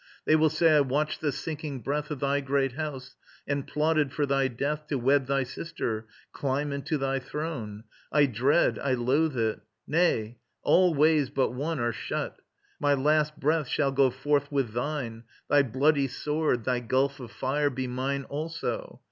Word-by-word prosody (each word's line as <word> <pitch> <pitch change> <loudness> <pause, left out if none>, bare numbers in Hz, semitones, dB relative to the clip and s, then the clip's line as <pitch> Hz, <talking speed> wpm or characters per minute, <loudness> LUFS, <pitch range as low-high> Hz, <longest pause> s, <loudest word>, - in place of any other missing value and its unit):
They 155 - +5
will 155 0 +4
say 155 0 +4
I - - +6
watched 150 +3 -1
the 150 - +1
sinking 145 -2 -5
breath 150 +5 -2
Of 150 -4 -5
thy 140 0 +1
great 135 0 +1
house 135 -2 -6 0.3
and 140 -1 -2
plotted 150 -2 +1
for 145 - 0
thy 135 -1 +2
death 145 +5 -3
To 145 - -1
wed 135 +2 +2
thy 135 0 +1
sister, 115 -5 -4 0.3
climb 140 +1 -1
into 140 +2 -2
thy 135 -1 0
throne... 125 -7 -5 0.3
I 150 -1 +5
dread, 135 +6 +2
I 135 -2 0
loathe 130 +4 +1
it. 110 -1 0 0.3
Nay, 120 -9 +1 0.2
all 180 -2 +4
ways 150 -1 +4
but 130 - 0
one 145 +4 -2
Are 120 0 0
shut. - - -4 0.4
My 145 -1 +3
last 150 +2 +1
breath 155 0 +1
shall 140 +1 +1
go 135 -1 +4
forth 145 +3 0
with 135 -6 0
thine, 120 -3 -3 0.3
Thy 145 - +6
bloody 140 +3 +2
sword, 150 -2 -1
thy 125 0 0
gulf 130 +3 0
of 125 -3 -8
fire 145 +4 0
be 130 -1 -3
mine 130 +2 -2
Also. 165 - -4
140 Hz, 175 wpm, -28 LUFS, 130-150 Hz, 0.4 s, I